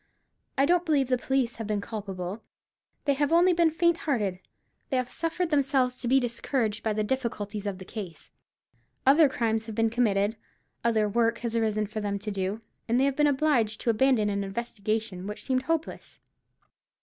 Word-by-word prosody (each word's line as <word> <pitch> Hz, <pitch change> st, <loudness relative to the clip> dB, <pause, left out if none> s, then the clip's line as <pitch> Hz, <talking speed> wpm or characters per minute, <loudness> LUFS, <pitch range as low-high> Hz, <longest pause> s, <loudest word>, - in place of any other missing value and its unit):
I 275 Hz, -, +4 dB
don't 350 Hz, +2 st, +3 dB
believe 290 Hz, -6 st, +1 dB
the 255 Hz, -, +3 dB
police 260 Hz, -2 st, 0 dB
have 225 Hz, -2 st, -5 dB
been 210 Hz, -1 st, 0 dB
culpable; 200 Hz, -2 st, -5 dB, 0.6 s
they 285 Hz, -, +3 dB
have 285 Hz, +2 st, 0 dB
only 350 Hz, +2 st, +5 dB
been 340 Hz, -1 st, +4 dB
faint 340 Hz, +1 st, +2 dB
hearted. 210 Hz, -, -1 dB, 0.5 s
They 265 Hz, -, +1 dB
have 250 Hz, 0 st, -2 dB
suffered 330 Hz, +1 st, -2 dB
themselves 265 Hz, -3 st, +2 dB
to 245 Hz, -, -3 dB
be 265 Hz, +3 st, +5 dB
discouraged 240 Hz, -2 st, -1 dB
by 220 Hz, -, 0 dB
the 215 Hz, 0 st, 0 dB
difficulties 210 Hz, -4 st, -3 dB
of 195 Hz, -2 st, -3 dB
the 185 Hz, -, -10 dB
case. 185 Hz, -5 st, -8 dB, 0.7 s
Other 285 Hz, +2 st, +6 dB
crimes 225 Hz, -3 st, -1 dB
have 220 Hz, -, -6 dB
been 225 Hz, 0 st, +2 dB
committed, 215 Hz, -2 st, +1 dB, 0.5 s
other 220 Hz, -2 st, +2 dB
work 230 Hz, +2 st, +1 dB
has 235 Hz, 0 st, -2 dB
arisen 215 Hz, -2 st, +1 dB
for 215 Hz, +1 st, -5 dB
them 200 Hz, -1 st, -1 dB
to 210 Hz, +1 st, -5 dB
do, 195 Hz, +2 st, -2 dB, 0.3 s
and 235 Hz, +2 st, +2 dB
they 270 Hz, -, +4 dB
have 275 Hz, -1 st, +1 dB
been 295 Hz, +1 st, +4 dB
obliged 265 Hz, -7 st, +2 dB
to 235 Hz, -, +2 dB
abandon 225 Hz, -2 st, +3 dB
an 200 Hz, 0 st, -1 dB
investigation 205 Hz, -2 st, -3 dB
which 210 Hz, -, -6 dB
seemed 260 Hz, -1 st, +1 dB
hopeless. 325 Hz, +3 st, -3 dB
230 Hz, 185 wpm, -27 LUFS, 210-270 Hz, 0.7 s, Other